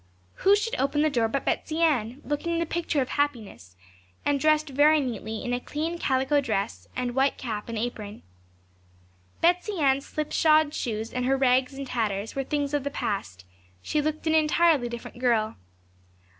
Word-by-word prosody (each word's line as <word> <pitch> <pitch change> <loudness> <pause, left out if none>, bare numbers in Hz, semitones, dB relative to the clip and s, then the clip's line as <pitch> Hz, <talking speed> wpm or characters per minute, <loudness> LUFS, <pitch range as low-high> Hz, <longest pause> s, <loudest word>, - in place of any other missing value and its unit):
Who 395 +1 +5
should 455 +3 -2
open 295 +2 +1
the 310 - +2
door 235 -4 +2
but 270 +4 -2
Betsey 315 0 -1
Ann, 260 -4 +1
looking 335 +3 -1
the 335 - 0
picture 325 -4 0
of 255 - -10
happiness, 230 - -3 0.5
and 285 -1 +2
dressed 310 +1 +2
very 300 +3 +5
neatly 225 -5 -4
in 245 - -1
a 245 - 0
clean 320 +6 -4
calico 265 +1 +2
dress, 215 -5 -3
and 250 -1 -2
white 270 +2 +2
cap 220 -3 -5
and 230 - -4
apron. 215 -2 -5 1.2
Betsey 360 +4 +2
Ann's 275 -1 +2
slipshod 305 0 +2
shoes 220 -4 -3
and 250 0 -1
her 270 +1 +2
rags 260 0 +2
and 275 0 -5
tatters 220 -4 -2
were 270 - -2
things 285 +1 -2
of 290 -2 0
the 285 - -2
past; 195 - -4 0.4
she 300 - 0
looked 310 +2 -3
an 315 - +2
entirely 310 -4 +3
different 235 0 -8
girl. 230 -4 +1
270 Hz, 170 wpm, -26 LUFS, 235-305 Hz, 1.2 s, Who